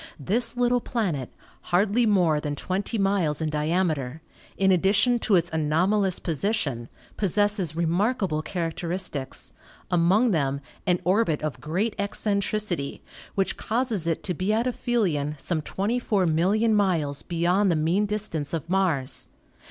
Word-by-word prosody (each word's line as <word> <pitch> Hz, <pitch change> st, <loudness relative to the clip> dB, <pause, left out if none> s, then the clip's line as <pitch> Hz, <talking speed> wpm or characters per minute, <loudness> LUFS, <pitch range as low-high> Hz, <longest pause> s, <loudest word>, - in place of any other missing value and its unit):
This 230 Hz, -, +1 dB
little 245 Hz, 0 st, +2 dB
planet, 175 Hz, -, -2 dB, 0.4 s
hardly 205 Hz, +6 st, +3 dB
more 175 Hz, -7 st, +3 dB
than 150 Hz, -1 st, -3 dB
twenty 195 Hz, +8 st, -2 dB
miles 195 Hz, -7 st, +1 dB
in 160 Hz, -1 st, -1 dB
diameter, 155 Hz, -2 st, -1 dB, 0.3 s
in 190 Hz, 0 st, +3 dB
addition 200 Hz, +7 st, +3 dB
to 215 Hz, -, +2 dB
its 175 Hz, -1 st, +1 dB
anomalous 180 Hz, +5 st, +1 dB
position, 150 Hz, -, -1 dB, 0.3 s
pos 195 Hz, -5 st, 0 dB
sesses 205 Hz, -6 st, +1 dB
remarkable 175 Hz, 0 st, 0 dB
characteristics, 165 Hz, -3 st, -3 dB, 0.4 s
among 185 Hz, +7 st, +3 dB
them 140 Hz, -5 st, 0 dB, 0.3 s
an 180 Hz, -1 st, +2 dB
orbit 180 Hz, -4 st, +1 dB
of 155 Hz, -2 st, -3 dB
great 190 Hz, +9 st, -1 dB
eccentricity, 200 Hz, -5 st, -1 dB, 0.3 s
which 195 Hz, -1 st, 0 dB
causes 225 Hz, -7 st, -1 dB
it 165 Hz, -, -1 dB
to 180 Hz, -, -1 dB
be 185 Hz, +5 st, -1 dB
at 225 Hz, +2 st, +1 dB
aphelion 190 Hz, -, 0 dB
some 155 Hz, +3 st, -2 dB
24,000,000 200 Hz, 0 st, +1 dB
miles 170 Hz, -9 st, +1 dB
beyond 180 Hz, +4 st, +1 dB
the 170 Hz, -, +2 dB
mean 170 Hz, +7 st, +1 dB
distance 195 Hz, -8 st, -3 dB
of 165 Hz, +2 st, -5 dB
Mars. 170 Hz, -9 st, 0 dB
185 Hz, 130 wpm, -25 LUFS, 155-210 Hz, 0.4 s, hardly